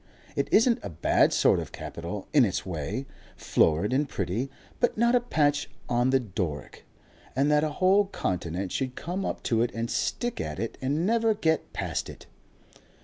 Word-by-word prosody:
It - - 0
isn't 230 +2 +5
a 100 - -5
bad 85 -1 +3
sort - - +4
of - - -6
capital 85 +4 -6
in 145 -4 +7
its 95 -5 -1
way, 90 - -3 0.3
florid 85 +9 +2
and 140 +1 +1
pretty, 100 +8 -2 0.3
but 240 - +1
not 235 +2 +3
a 245 - +6
patch 145 -11 +1 0.2
on 120 +1 +2
the 135 0 +4
Doric; 90 - -5 0.5
and 140 +3 +2
that 150 0 +4
a 155 - +1
whole 195 +2 +4
continent 90 - -3
should 130 -2 -2
come 180 +3 -4
up - - -4
to 115 -2 +1
it 120 - +1
and 115 0 -2
stick 240 -1 -1
at - - -4
it 115 - -3
and 145 +6 0
never 225 0 +2
get 160 -6 0
past - - -3
it!..." - - -11
130 Hz, 180 wpm, -27 LUFS, -, 0.5 s, in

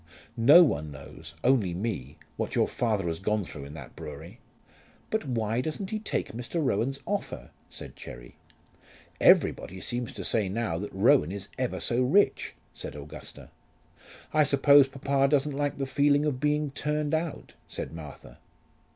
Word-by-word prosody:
No 125 +9 +8
one 80 - 0
knows, 75 +3 -11
only 115 -9 +3
me, 85 - -4 0.2
what - - -3
your - - +3
father 110 -6 -1
has 80 -1 -2
gone 105 +1 0
through 70 -5 -8
in 70 +2 -10
that 80 - -10
brewery." 80 - -9 0.7
"But 220 -4 0
why 115 -1 0
doesn't 185 +8 -4
he 215 - -1
take 215 - -3
Mr. 120 +8 -4
Rowan's 135 -1 0
offer?" 205 -1 -4 0.2
said - - -9
Cherry. - - -10 0.8
"Everybody 95 - +4
seems 120 +4 -3
to - - -6
say 105 -4 +1
now 100 -5 -2
that 105 - -5
Rowan 95 -5 +4
is 100 0 -6
ever 130 -2 -1
so 120 +1 +1
rich," 175 +12 +2 0.2
said - - -7
Augusta. 75 0 -10 0.8
"I 155 - +5
suppose 140 0 +6
papa 135 0 +1
doesn't 145 0 +2
like 145 0 -1
the 135 - -1
feeling 145 +2 +3
of 140 -4 -1
being 150 0 +1
turned 150 +1 -1
out," 160 0 -2
said - - -6
Martha. 80 -2 -10
120 Hz, 160 wpm, -28 LUFS, 95-145 Hz, 0.8 s, No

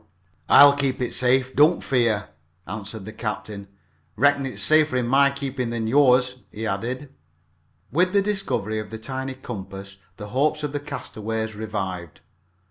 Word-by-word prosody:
"I'll 140 0 +8
keep 140 -2 0
it 125 - -2
safe, 130 +1 +2
don't 155 +5 +4
fear," 115 -8 +1 0.4
answered 105 +1 -7
the 110 - -8
captain. 105 -2 -5 0.5
"Reckon 140 +2 +3
it 130 - -7
is - - -4
safer 155 -3 +3
in 125 -1 +1
my 140 +3 +4
keepin' 140 -3 -4
than 115 -1 -3
yours," 125 0 +3
he 110 +2 -5
added. 120 +7 -4 0.8
With 180 +4 +2
the 200 0 +3
discovery 120 - -1
of 110 - -7
the 110 - -6
tiny 130 +3 -5
compass 100 -5 -8 0.2
the 105 -1 -8
hopes 150 +5 0
of 150 - -2
the 145 - -3
castaways 110 -6 -5
revived. 95 -6 -5
125 Hz, 155 wpm, -23 LUFS, 110-140 Hz, 0.8 s, I'll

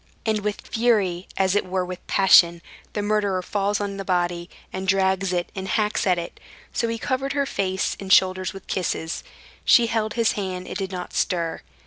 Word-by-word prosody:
And 220 -1 +1
with 205 0 -3
fury, 205 -6 +1
as 190 -1 +2
it 205 - +2
were 185 0 -2
with 180 0 -8
passion, 170 -3 +5 0.3
the 205 - -2
murderer 205 -3 0
falls 200 +2 0
on 200 -1 -3
the 195 - -4
body, 175 -1 -1 0.2
and 190 0 -4
drags 190 0 +2
it 175 -1 -2
and 190 0 -5
hacks 210 +1 0
at 180 -1 +3
it; 170 - -6 0.3
so 230 - 0
he 230 0 -2
covered 270 +3 -2
her 280 0 +1
face 190 -6 -1
and 195 -1 -5
shoulders 185 0 +4
with 195 - -11
kisses. 165 -3 -2 0.4
She 240 - +6
held 220 -1 -1
his 230 -2 +3
hand, 185 -3 -4
and - - -7
did 190 -1 -3
not 180 -1 -6
stir. 170 -2 -1
190 Hz, 190 wpm, -24 LUFS, 185-210 Hz, 0.4 s, She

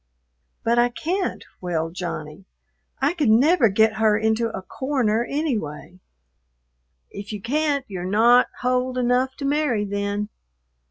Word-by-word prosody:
'" 60 0 -48
"But 235 +1 +3
I 240 0 +4
can't," 360 +9 -3 0.2
wailed 165 -2 -2
Johnny. 165 -1 -6 0.5
"I 275 +4 +2
could 300 -9 +1
never 255 +3 +5
get 220 +2 +2
her 215 -1 +3
into 220 +1 +1
a 190 - -6
corner 240 -3 0
anyway." 205 - -3 1.1
"If 200 +1 -8
you 210 - -5
can't, 280 +4 0
you're 185 -3 -6
not 235 +5 +5
hold 255 0 0
enough 250 +1 +1
to 280 - -5
marry 280 -7 +1
then. 205 +1 -2
225 Hz, 140 wpm, -23 LUFS, 200-260 Hz, 1.1 s, never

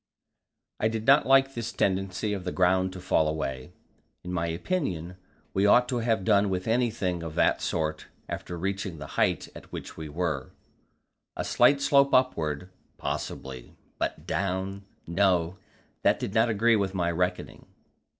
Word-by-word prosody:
I 110 - +2
did 110 0 -3
not 140 +2 +5
like 135 0 +5
this 115 -1 -4
tendency 95 +1 -1
of 95 -3 -4
the 90 - -3
ground 95 0 +2
to 95 - -8
fall 80 -3 +2
away. 65 -4 -3 0.5
In 90 - -5
my 85 -1 0
opinion, 90 - -2 0.4
we 100 +1 +3
ought 125 +4 +5
to 125 - 0
have 115 -5 0
done 100 -2 +4
with 90 +1 -2
anything 110 -7 0
of 80 -2 -6
that - - +2
sort 80 -1 -2 0.2
after 90 - -5
reaching 95 0 -3
the 75 - -7
height - - +1
at - - -13
which - - -7
we 80 -1 -6
were; 75 -4 -3 0.8
a - - -1
slight 140 0 +4
slope 140 0 +4
upward, 85 - +1 0.3
possibly, 65 -2 -5 0.2
but - - -3
down 95 +1 -2 0.2
no, 90 0 +1 0.4
that - - +3
did 95 - -4
not 115 +1 +3
agree 115 +2 +3
with 100 -2 -1
my 85 -2 +1
reckoning. 90 +1 -2
95 Hz, 160 wpm, -27 LUFS, 85-110 Hz, 0.8 s, not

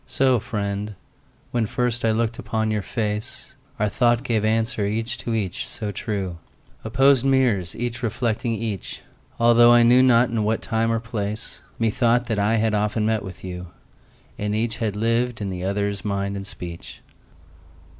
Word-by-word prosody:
So, 130 -2 +2
friend, 100 0 -3 0.6
when 120 -3 0
first 125 0 -1
I 115 - +3
look'd 115 +1 0
upon 110 -1 -1
your 105 -1 0
face, 105 +5 -4 0.2
Our 105 -2 +1
thought 120 +3 +2
gave 115 -5 0
answer 110 -1 +1
each 115 +3 -2
to 115 - -2
each, 95 -5 -3
so 105 -2 -5
true— 95 -4 -4 0.4
Opposed 135 +3 +4
mirrors 125 -10 +2
each 120 +1 -4
reflecting 115 0 -1
each— 110 -3 -4 0.4
Altho' 120 0 +6
I 120 0 +7
knew 120 +2 +6
not 125 -2 +5
in 115 -2 0
what 110 +1 0
time 115 0 0
or 115 - +1
place, 110 -1 -5 0.2
Methought 120 +2 +2
that 110 -3 -1
I 105 +3 +2
had 110 -1 +1
often 105 +1 0
met 110 -1 +1
with 95 -2 -9
you, 90 -1 -6 0.7
And 105 0 -1
each 110 +1 0
had 110 -4 -2
lived 115 +2 0
in 100 -2 -3
the 90 -1 -5
other's 100 +1 -1
mind 100 -1 -2
and 100 0 -6
speech. 85 -3 -8
110 Hz, 165 wpm, -23 LUFS, 105-120 Hz, 0.7 s, I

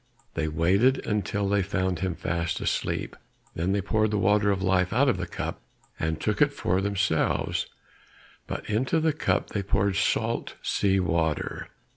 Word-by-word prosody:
They 80 -1 -1
waited 95 - +2
until 100 -1 -1
they 100 0 +2
found 95 -2 -1
him 95 -2 -1
fast 85 0 -2
asleep, - - -2 0.4
then 85 +3 -1
they 100 0 +1
poured 110 +2 +1
the 105 - 0
water 105 +1 +3
of 95 -1 0
life 95 -1 +2
out 135 +5 +4
of 125 - +2
the 90 0 -4
cup, - - -5 0.4
and 80 0 -1
took - - -1
it - - +5
for 95 +2 0
themselves, 100 -5 0 0.8
but - - -5
into 130 +9 +1
the 160 -1 +2
cup 155 - 0
they 100 - -1
poured 100 0 +1
salt - - 0
sea 95 -1 +2
water. 85 -3 -1
95 Hz, 165 wpm, -27 LUFS, 90-105 Hz, 0.8 s, it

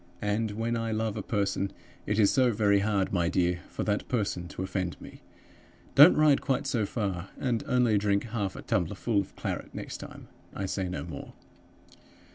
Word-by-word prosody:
And 105 +2 0
when 115 +2 -1
I 115 -1 -2
love 110 -1 -1
a 105 - -3
person, 100 -1 -1 0.4
it 105 - 0
is 105 -3 +5
so 130 -2 +4
very 100 -2 +3
hard, 100 -2 0
my 85 -2 +2
dear, 90 0 +1
for - - -4
that 105 -1 -1
person 100 -7 -1
to 95 - -5
offend 95 -2 -3
me! - - -12 0.7
Don't 145 +5 +9
ride 150 -2 +5
quite 135 - 0
so 110 -4 0
far, 95 -5 -3
and 120 -4 0
only 120 -5 +3
drink 100 -1 +1
half 105 -5 -3
a - - -8
tumblerful 110 -4 0
of 100 - -11
claret - - -5
next - - -5
time. - - -10 0.3
I 95 - -2
say 95 -1 -2
no 90 - -4
more. - - -8
105 Hz, 185 wpm, -29 LUFS, 95-115 Hz, 0.7 s, Don't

